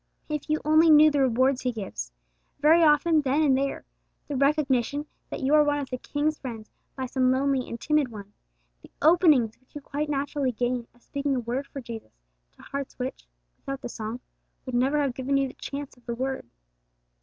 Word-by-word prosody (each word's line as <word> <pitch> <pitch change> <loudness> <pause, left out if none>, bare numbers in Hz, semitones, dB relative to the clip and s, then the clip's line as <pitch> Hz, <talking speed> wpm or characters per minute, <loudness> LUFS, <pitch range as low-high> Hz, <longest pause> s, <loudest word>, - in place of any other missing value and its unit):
If 300 0 -4
you 310 0 +2
only 315 +2 +5
knew 305 0 +8
the 290 - +1
rewards 260 +1 +2
He 250 - 0
gives 190 - -6 0.5
very 315 +4 +5
often 310 +1 +4
then 285 +3 +1
and 275 -3 +4
there; 275 +1 -2 0.4
the 290 - -3
recognition 280 0 +1 0.2
that - - -5
you 270 +2 +1
are 305 0 +7
one 290 0 +1
of 280 -2 -5
the 255 - -3
King's 300 +3 -1
friends 225 -5 -8 0.2
by 260 - -3
some 255 0 +2
lonely 265 0 +1
and 235 - -6
timid 300 0 +2
one; 205 -3 -10 0.5
the - - -15
openings 305 - +4
which 260 - -34
you 295 - -6
quite 295 +2 -3
naturally 280 -2 -1
gain 245 +1 -1
of 240 - -27
speaking 280 -1 -2
a - - 0
word 245 +4 -3
for 275 - -7
Jesus 225 - -9 0.3
to - - -18
hearts 275 -1 -6
which, 255 - -5 0.3
without 275 0 -6
the - - -6
song, 225 +2 -5 0.4
would 255 - -6
never 265 +5 +2
have 280 -3 0
given 265 +2 0
you 275 0 +1
the - - -10
chance 280 0 -7
of 245 -1 -26
the 235 - -2
word! 260 - -3
275 Hz, 200 wpm, -26 LUFS, 250-295 Hz, 0.5 s, knew